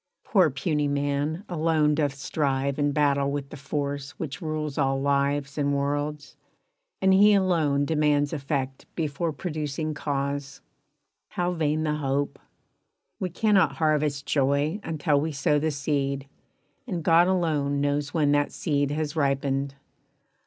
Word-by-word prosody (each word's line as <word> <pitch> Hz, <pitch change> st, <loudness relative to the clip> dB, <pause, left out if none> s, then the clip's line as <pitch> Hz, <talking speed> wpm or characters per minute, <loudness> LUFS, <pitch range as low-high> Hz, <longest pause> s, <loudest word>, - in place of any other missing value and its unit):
Poor 185 Hz, -6 st, +4 dB
puny 150 Hz, +1 st, -1 dB
man 145 Hz, +4 st, -1 dB
Alone 160 Hz, -3 st, +2 dB
doth 145 Hz, -2 st, 0 dB
strive 140 Hz, -1 st, -1 dB
and 145 Hz, 0 st, +2 dB
battle 140 Hz, -1 st, +2 dB
with 140 Hz, -1 st, -4 dB
the -, -, -7 dB
Force 140 Hz, 0 st, -4 dB
Which 140 Hz, -4 st, -5 dB
rules 155 Hz, -3 st, -3 dB
all 135 Hz, -1 st, +1 dB
lives 140 Hz, +1 st, 0 dB
and 145 Hz, 0 st, +1 dB
worlds, 145 Hz, +1 st, -2 dB, 0.7 s
and 190 Hz, 0 st, +5 dB
he 205 Hz, +2 st, +6 dB
alone 160 Hz, -7 st, +2 dB
Demands 150 Hz, -1 st, +1 dB
effect 135 Hz, -2 st, -3 dB
before 160 Hz, +1 st, -1 dB
producing 155 Hz, -1 st, -3 dB
cause. 140 Hz, -1 st, -3 dB, 0.7 s
How 175 Hz, 0 st, -1 dB
vain 155 Hz, -2 st, 0 dB
the 150 Hz, -1 st, 0 dB
hope! 140 Hz, 0 st, -1 dB, 0.8 s
We 185 Hz, -, -2 dB
cannot 200 Hz, +2 st, +3 dB
harvest 150 Hz, -3 st, 0 dB
joy 140 Hz, +5 st, +1 dB
Until 150 Hz, -3 st, +1 dB
we 160 Hz, +2 st, -2 dB
sow 145 Hz, +1 st, +1 dB
the 160 Hz, +2 st, 0 dB
seed, 140 Hz, -2 st, -2 dB, 0.6 s
and 175 Hz, -7 st, -3 dB
God 170 Hz, +2 st, +5 dB
alone 155 Hz, -6 st, +1 dB
Knows 145 Hz, 0 st, 0 dB
when 150 Hz, -3 st, +2 dB
that 145 Hz, 0 st, +2 dB
seed 145 Hz, -4 st, 0 dB
has 150 Hz, 0 st, -2 dB
ripened. 140 Hz, -1 st, 0 dB
145 Hz, 140 wpm, -26 LUFS, 140-155 Hz, 0.8 s, he